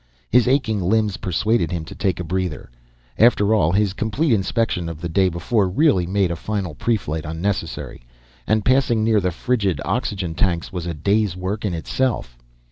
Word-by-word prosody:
His 125 -1 +4
aching 125 -6 +1
limbs 105 +2 +1
persuaded 90 0 0
him 85 -3 -3
to - - -9
take 95 -3 -1
a - - -2
breather. 90 -6 -3 0.5
After 110 -2 +4
all, 80 -7 +3
his 100 0 +1
complete 115 +8 0
inspection 95 -3 0
of 80 -2 -7
the 85 - -4
day 95 +3 +2
before 95 +4 0
really 95 - +2
made 95 -1 +1
a - - -2
final 95 -1 -3
preflight 80 -5 -1
unnecessary, 80 -4 -4 0.4
and 110 -1 +1
passing 125 -4 +3
near 110 -2 +3
the 90 - +1
frigid 95 - -1
oxygen 90 -5 -2
tanks 85 0 -1
was 90 -2 -4
a 85 - -3
day's 100 +3 +1
work 95 +4 -3
in 95 -4 -1
itself. 105 - -2
95 Hz, 175 wpm, -21 LUFS, 85-110 Hz, 0.5 s, His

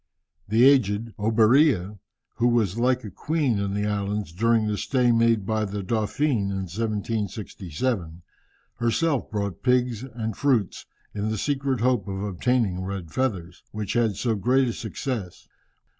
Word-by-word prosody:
The 110 +4 +4
aged 115 -5 +2
Oberea, 110 - +3 0.4
who 120 - +3
was 115 -4 +1
like 125 +1 +2
a 105 - -7
queen 140 - 0
in 100 0 -2
the 105 0 -1
island 100 -3 -2
during 115 +2 +2
the 105 -1 0
stay 125 +2 +1
made 115 -3 +3
by 110 +1 0
the 100 -1 -4
Dauphin 110 +2 0
in 95 -1 -2
1767, 100 - -3 0.5
herself 135 +5 0
brought 100 -4 -3
pigs 125 -3 +1
and 115 -4 -5
fruits, 125 -9 0 0.3
in 105 +1 -2
the 110 - -2
secret 135 -1 -1
hope 120 -5 +1
of 95 0 -4
obtaining 105 -1 0
red 95 -3 -5
feathers, 95 -10 -2
which 105 -2 -4
had 115 -4 +1
so 115 +4 0
great 125 +6 +2
a - - -2
success. 115 -5 -5
110 Hz, 145 wpm, -25 LUFS, 100-125 Hz, 0.5 s, The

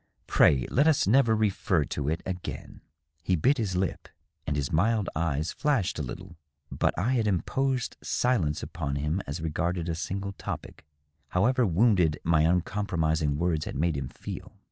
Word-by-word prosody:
Pray 65 -3 +4
let 140 +5 +4
us 155 -3 +4
never 115 +1 +4
refer 95 -7 +1
to 70 0 -3
it 80 - -2
again." 90 -1 -6 0.4
He 90 +2 +1
bit 130 - +2
his 100 -5 -1
lip, 95 0 -2 0.4
and 75 - 0
his 70 -2 -2
mild 105 +5 +1
eyes 80 -1 -1
flashed 135 - 0
a - - 0
little. 90 +6 -7 0.3
But - - 0
I 105 +9 +1
had 115 -4 +1
im 95 -5 +1
posed 135 -2 -1
silence 95 -13 0
upon 70 -4 -4
him 75 +6 -1
as 70 +4 -4
regarded 85 +2 -1
a 85 - -1
single 100 +4 -3
topic, 90 - -7 0.4
however 120 +6 +2
wounded 90 -4 +3
my 80 -2 +3
uncompromising 80 -4 +1
words 80 -2 0
had - - -6
made 80 +3 +1
him 70 -2 -3
feel. - - -8
90 Hz, 165 wpm, -28 LUFS, 80-105 Hz, 0.4 s, Pray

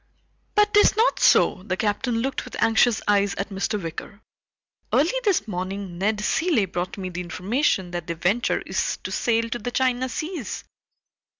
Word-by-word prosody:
"But 420 0 +3
'tis 415 0 +5
not 455 +3 +3
so." - - +4
The 185 -1 -3
Captain 230 +3 0
looked 270 0 -2
with - - -9
anxious 225 0 +3
eyes 200 -1 +2
at 195 - -3
Mr. 205 +2 -2
Wicker. 170 +3 -7 0.7
"Early 315 - +3
this 385 - +1
morning 185 -1 -5
Ned 210 +2 0
Cilley 320 - +1
brought 180 +1 -4
me 185 -2 -4
the 180 0 -5
information 190 - -1
that 175 -2 -5
the 170 - -3
Venture 195 +9 0
is - - -1
to - - -5
sail 230 -1 +1
to 240 - -2
the 245 - -4
China 255 0 0
seas." 310 - -5
210 Hz, 170 wpm, -24 LUFS, 185-255 Hz, 0.7 s, tis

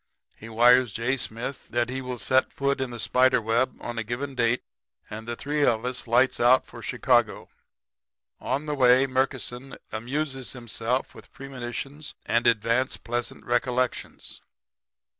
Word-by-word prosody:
He 115 - -11
wires 120 +1 +5
J. 120 +3 0
Smith 120 +2 -5
that 120 0 0
he 130 +1 -3
will 125 -1 -5
set 130 +4 +2
foot 140 0 -1
in 130 - -2
the 120 -1 -8
spider 125 +2 +3
web 115 +3 0
on 120 -1 -5
a - - -1
given 130 +6 -4
date; 125 -1 +1 0.5
and 110 +1 -7
the 120 - -3
three 145 +4 -1
of 115 -3 +2
us 125 -1 -3
lights 125 +3 +3
out 125 +2 +5
for 120 - -12
Chicago. 120 -1 +1 0.9
"On 145 +3 -2
the 150 - -2
way 130 -1 +5
Murkison 130 0 -2 0.2
amuses 135 +4 -3
himself 120 +1 -2
with - - -15
premonitions 135 +2 -7
and 120 +1 +2
advance 115 +3 +2
pleasant 120 0 -4
recollections. 125 +1 -2
125 Hz, 150 wpm, -26 LUFS, 120-130 Hz, 0.9 s, wires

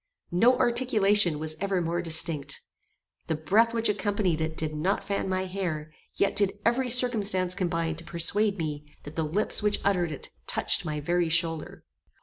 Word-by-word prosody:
No 235 +9 +4
articulation 210 - +2
was 155 +1 -4
ever 195 -2 0
more 170 0 -2
distinct. 160 -4 0 0.6
The 160 - -1
breath 210 +9 +2
which 230 -1 +1
accompanied 200 -5 -1
it 160 0 -3
did 155 -1 -2
not 175 +7 -1
fan 200 -1 -3
my 185 0 -1
hair, 170 -5 -5 0.2
yet 200 - 0
did 200 -1 +1
every 250 +2 +1
circumstance 210 -7 +3
combine 165 -4 -2
to 165 - -8
persuade 200 +5 +1
me 150 -3 -4 0.2
that 145 +1 -10
the 165 - -1
lips 170 +10 +3
which 210 0 +1
uttered 180 -4 +1
it 145 - -9 0.2
touched - - +1
my 150 -1 -3
very 175 +2 0
shoulder. 165 -1 -1
180 Hz, 165 wpm, -27 LUFS, 160-205 Hz, 0.6 s, No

